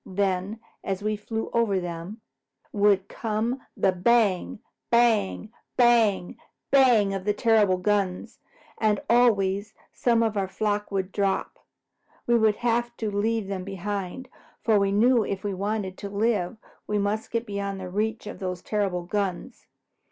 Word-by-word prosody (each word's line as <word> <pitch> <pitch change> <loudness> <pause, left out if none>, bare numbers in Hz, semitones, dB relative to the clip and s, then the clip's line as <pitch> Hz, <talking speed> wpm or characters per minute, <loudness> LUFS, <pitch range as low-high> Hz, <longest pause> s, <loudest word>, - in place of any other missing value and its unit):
Then, 195 +2 -1 0.2
as 195 0 -3
we 215 0 0
flew 220 +2 -5
over 225 -5 +2
them, 175 +5 -6 0.5
would 200 -2 +3
come 230 +3 -2 0.2
the 190 - +3
bang, 195 0 +2 0.3
bang, 220 -3 +2 0.3
bang, 230 -7 +3 0.3
bang 245 -7 +5
of 195 +2 -1
terrible 210 -5 +3
guns, 195 -1 -1 0.4
and 215 -2 +2
always 210 -4 +2 0.2
some 230 -2 +2
of 220 -1 0
our 195 -1 0
flock 210 +2 -2
would 195 -1 -2
drop. 195 -1 -1 0.7
We 240 - +3
would 220 -2 +4
have 240 0 0
to 220 -2 -2
leave 220 +1 0
them 190 -1 -4
behind, 195 +4 -5 0.4
for 220 -3 +4
we 200 0 +1
knew 230 +3 +4
if 195 -1 -4
we 205 -1 -2
wanted 200 0 -3
to 200 - -5
live 205 -2 0 0.3
we 210 - 0
must 205 +2 -1
get 230 0 -2
beyond 200 -2 -4
the 185 - -6
reach 215 +4 -2
of 210 - -7
those 180 -2 -4
terrible 195 -4 -1
guns. 200 +5 -3
205 Hz, 145 wpm, -26 LUFS, 195-225 Hz, 0.7 s, bang